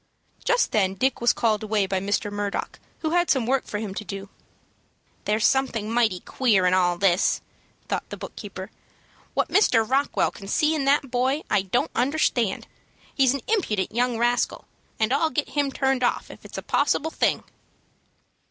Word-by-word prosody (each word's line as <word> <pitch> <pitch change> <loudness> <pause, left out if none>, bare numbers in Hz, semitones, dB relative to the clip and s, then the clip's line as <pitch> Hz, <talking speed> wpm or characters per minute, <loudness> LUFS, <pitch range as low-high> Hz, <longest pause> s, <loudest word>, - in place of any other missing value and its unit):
Just - - +2
then 195 -3 +1
Dick 260 +3 0
was 240 - +5
called 220 -3 +1
away 215 -2 +1
by 190 0 -1
Mr. 205 +1 -1
Murdock, 205 -1 -3 0.2
who 315 - -1
had 350 0 +2
some 260 -4 +2
work 265 +2 +1
for 210 - -3
him 205 -2 -4
to 210 - -5
do. 195 -1 -7 1.0
"There's 215 +1 +1
something 235 -5 +1
mighty 225 -7 +2
queer 215 -8 +2
in 180 - +3
all 175 -1 +2
this," 190 -1 +2 0.5
thought - - -3
the - - -6
book - - -9
keeper. - - -8 0.6
"What - - +1
Mr. 225 - +3
Rockwell 275 +3 +1
can 195 - -11
see 305 +9 +2
in 295 -3 -1
that 275 -1 +2
boy, 260 +4 +1
I 210 - +4
don't 190 -1 -1
understand. 245 -5 0 0.5
He's 270 -1 +3
an 275 - -4
impudent 315 - 0
young 245 0 +1
rascal, 240 +1 0 0.3
and 220 +3 +2
I'll 315 +3 +2
get 295 0 -2
him 285 -2 0
turned 265 -1 0
off 245 - 0
if - - -14
it's - - -9
a - - -5
possible 320 +2 +1
thing." - - +1
240 Hz, 180 wpm, -24 LUFS, 205-270 Hz, 1.0 s, was